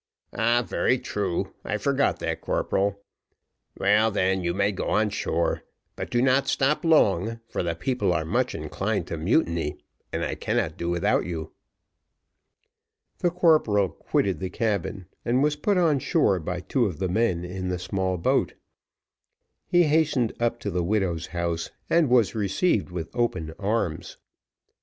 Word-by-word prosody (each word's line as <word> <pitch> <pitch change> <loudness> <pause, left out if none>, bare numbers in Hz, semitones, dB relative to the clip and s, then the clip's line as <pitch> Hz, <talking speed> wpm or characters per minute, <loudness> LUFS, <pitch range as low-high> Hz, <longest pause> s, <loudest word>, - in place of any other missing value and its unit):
"Ah, 120 +2 +2
very 130 - +1
true, 105 -7 -3
I - - -2
forgot - - +1
that, - - -2
corporal. 100 0 -1 0.7
Well, 105 +3 +4
then, 95 -2 +1
you 85 - 0
may 100 +3 +1
go 95 - -4
on 105 0 +2
shore; 85 -4 -1 0.3
but - - -5
do 120 0 +1
not 135 +1 +3
stop 140 +6 +1
long, 115 - +3
for - - -3
the 85 -2 -2
people 100 +2 0
are 80 -2 0
much 80 - 0
inclined - - -2
to - - -2
mutiny, 85 - +1 0.3
and - - -1
I - - -2
cannot 80 - -1
do 85 - -3
without 85 -1 +1
you." 80 -3 -5 1.7
The 175 - +2
corporal 155 - +3
quitted 95 -2 -1
the 95 - -3
cabin 100 -2 -2 0.2
and 125 +3 +2
was 150 0 +2
put 195 +6 +1
on 160 -6 +3
shore 105 - +2
by 90 +2 -4
two 120 +4 +1
of 90 -6 -5
the 95 - -1
men 90 -3 0
in 95 +1 -4
the 90 - -1
small 95 +1 -2
boat. 85 - +1 1.1
He 175 0 +4
hastened 150 -7 +2
up 120 0 0
to 100 - -3
the 90 0 0
widow's 90 -4 0
house, 85 -1 -2 0.2
and 165 -5 +4
was 120 -4 +4
received 105 - +1
with 85 -3 -5
open 80 -10 -1
arms. 100 -5 -2
100 Hz, 155 wpm, -25 LUFS, 90-120 Hz, 1.7 s, Well